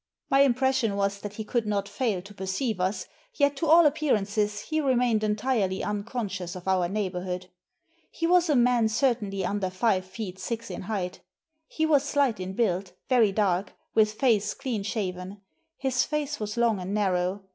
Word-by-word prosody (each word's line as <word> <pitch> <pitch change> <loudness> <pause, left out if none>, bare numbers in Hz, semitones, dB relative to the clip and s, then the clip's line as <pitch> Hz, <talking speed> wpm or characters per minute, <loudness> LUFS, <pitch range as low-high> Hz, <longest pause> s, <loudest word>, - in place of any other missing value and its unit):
My 270 - +5
impression 265 -4 +3
was 200 0 0
that 205 0 -7
he 220 - -4
could 225 0 -1
not 205 -1 -1
fail 215 -9 -1
to 200 +2 -12
perceive 195 +3 -2
us, 190 +3 -1 0.3
yet 285 -1 +2
to 325 - -1
all 330 +2 +7
appearances 210 -8 +1
he 310 +7 -1
remained 245 -5 +2
entirely 210 -3 0
unconscious 200 -4 -3
of 185 0 -9
our 185 -2 +2
neighbourhood. 185 -2 -3 0.6
He 330 - -3
was 350 0 +4
a 295 - +4
man 245 -2 +4
certainly 215 -5 0
under 195 0 -1
five 185 0 +1
feet 190 -1 -7
six 230 +2 -4
in 180 - -5
height 185 -4 -3 0.5
He 315 - -1
was 295 -3 +4
slight 280 -6 +1
in 185 +1 -4
build, 190 -4 0 0.2
very 235 -6 +4
dark, 195 -2 0 0.2
with 215 -1 +3
face 215 -3 +1
clean 240 -6 -3
shaven; 195 -2 -4 0.4
his 260 -2 +1
face 295 -1 -2
was 210 +1 -4
long 230 -4 +2
and 185 +3 -3
narrow. 190 -1 0
210 Hz, 170 wpm, -27 LUFS, 190-250 Hz, 0.6 s, all